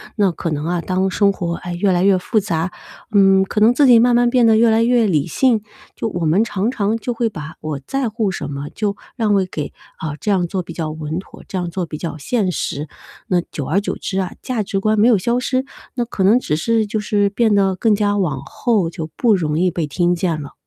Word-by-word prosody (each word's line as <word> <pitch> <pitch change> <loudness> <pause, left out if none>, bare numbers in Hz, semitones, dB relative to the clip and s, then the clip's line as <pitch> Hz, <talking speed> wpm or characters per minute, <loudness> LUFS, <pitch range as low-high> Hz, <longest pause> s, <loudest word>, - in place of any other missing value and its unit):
那 200 -4 +2
可 165 0 -4
能 150 +1 -2
啊， 175 0 0
当 185 +1 0
生 200 +1 +3
活， 170 -3 -3
哎， 175 +1 -6
越 190 +3 +1
来 180 0 +2
越 195 -1 +4
复 215 +4 0
杂， 175 -3 -2 0.4
嗯， 195 -1 +5
可 210 - -2
能 225 +3 +5
自 285 +2 +4
己 235 -2 +7
慢 240 0 +4
慢 240 0 +4
变 245 -2 +4
得 220 - +5
越 235 +1 +5
来 225 +1 +3
越 240 -1 +3
理 165 -6 +1
性， 230 - +2 0.3
就 225 - -3
我 175 -5 -3
们 165 +6 +3
常 215 +1 -1
常 210 -2 0
就 240 +2 -3
会 230 0 0
把 155 -5 -8
“我 155 -3 -4
在 270 -3 -1
乎 215 -3 -1
什 - - -5
么” 140 +1 -5
就 205 -2 -1 0.2
让 215 -3 +2
位 195 -2 +2
给 155 -5 -5 0.3
“啊， 150 -2 -4
这 210 -1 -1
样 180 -3 +1
做 185 0 -3
比 - - -10
较 160 -2 -3
稳 155 +1 -4
妥， 190 - -13
这 190 - -4
样 175 -1 -2
做 175 +1 -3
比 155 - -7
较 160 -1 -5
现 195 - -1
实”。 150 -2 -3 0.4
那 180 -1 +2
久 145 - -4
而 195 +6 +1
久 - - -3
之 190 - -3
啊， 185 -2 -2
价 235 -5 -2
值 195 0 -2
观 215 +2 +1
没 225 - +5
有 220 - +5
消 235 +6 0
失， 255 +1 -1 0.3
那 240 - -1
可 205 -5 -3
能 215 +6 +5
只 150 - -1
是 220 +7 +1
就 215 +1 -2
是 205 -1 +1
变 220 +1 +2
得 195 -2 +2
更 215 +3 +2
加 205 0 +1
往 150 -9 -1
后， 210 - 0
就 160 -1 -6
不 225 -4 +3
容 155 -4 -1
易 185 - +3
被 165 -2 -2
听 175 +4 +1
见 170 -3 -1
了。 140 - -9
195 Hz, 270 characters per minute, -19 LUFS, 170-220 Hz, 0.4 s, 己